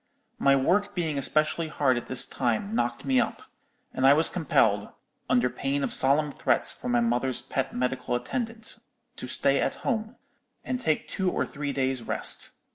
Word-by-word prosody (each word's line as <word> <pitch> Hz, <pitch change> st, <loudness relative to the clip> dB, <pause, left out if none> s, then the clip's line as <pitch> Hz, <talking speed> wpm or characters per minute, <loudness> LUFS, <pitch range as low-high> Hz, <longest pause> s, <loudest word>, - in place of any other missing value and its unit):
My 140 Hz, 0 st, +4 dB
work 205 Hz, +9 st, +1 dB
being 160 Hz, -5 st, -1 dB
especially 155 Hz, +3 st, +1 dB
hard 140 Hz, -4 st, +1 dB
at 120 Hz, -, -5 dB
this 130 Hz, -1 st, +4 dB
time 130 Hz, -, -2 dB
knocked 120 Hz, -, -2 dB
me 130 Hz, -2 st, +3 dB
up; -, -, -4 dB, 0.5 s
and 130 Hz, -, -3 dB
I 140 Hz, -, +8 dB
was 160 Hz, +2 st, +2 dB
compelled, 110 Hz, -, +1 dB, 0.4 s
under 125 Hz, 0 st, +3 dB
pain 140 Hz, +3 st, -2 dB
of -, -, +1 dB
solemn 145 Hz, +2 st, +4 dB
threats -, -, 0 dB
from 120 Hz, -, -5 dB
my 120 Hz, -, +3 dB
mother's 120 Hz, +1 st, 0 dB
pet 135 Hz, +1 st, -3 dB
medical 125 Hz, 0 st, -2 dB
attendant, 225 Hz, -, -4 dB, 0.4 s
to -, -, -6 dB
stay -, -, +2 dB
at -, -, -1 dB
home, 220 Hz, -2 st, -2 dB, 0.5 s
and 255 Hz, -, -3 dB
take 155 Hz, -10 st, 0 dB
two 190 Hz, -1 st, -1 dB
or -, -, -1 dB
three 145 Hz, -1 st, -5 dB
days' 130 Hz, -2 st, -1 dB
rest. -, -, +2 dB
140 Hz, 175 wpm, -26 LUFS, 125-165 Hz, 0.5 s, I